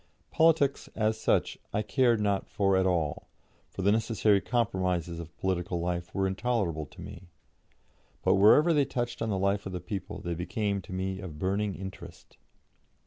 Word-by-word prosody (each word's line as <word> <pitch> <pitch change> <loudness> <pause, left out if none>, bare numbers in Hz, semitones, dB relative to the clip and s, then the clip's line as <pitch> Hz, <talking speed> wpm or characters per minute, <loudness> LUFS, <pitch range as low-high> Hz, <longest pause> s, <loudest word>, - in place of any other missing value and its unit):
Politics, 160 -4 +3
as 110 0 0
such, - - +1
I 105 - 0
cared 115 +2 +2
not 100 -2 0
for 95 -2 +2
at 95 0 +3
all, 85 -5 -1 0.4
for 95 - -6
the 100 - +4
necessary 110 -2 +2
compromises 90 -8 -1
of 85 0 -10
political 90 -1 -1
life 85 0 -3
were 95 -1 +1
intolerable 95 -6 -1
to - - -14
me; 90 - -10 1.0
but - - +4
wherever 145 - +6
they 145 -2 +4
touched 120 -3 -3
on 115 - -1
the 100 - 0
life 100 +1 0
of 95 - -6
the 90 - -3
people 95 0 -6
they 85 - -3
became 100 +4 -2
to 95 - -13
me 95 +1 -3
of 90 -6 -8
burning 100 +3 -1
interest. 95 0 -10
95 Hz, 170 wpm, -29 LUFS, 90-110 Hz, 1.0 s, wherever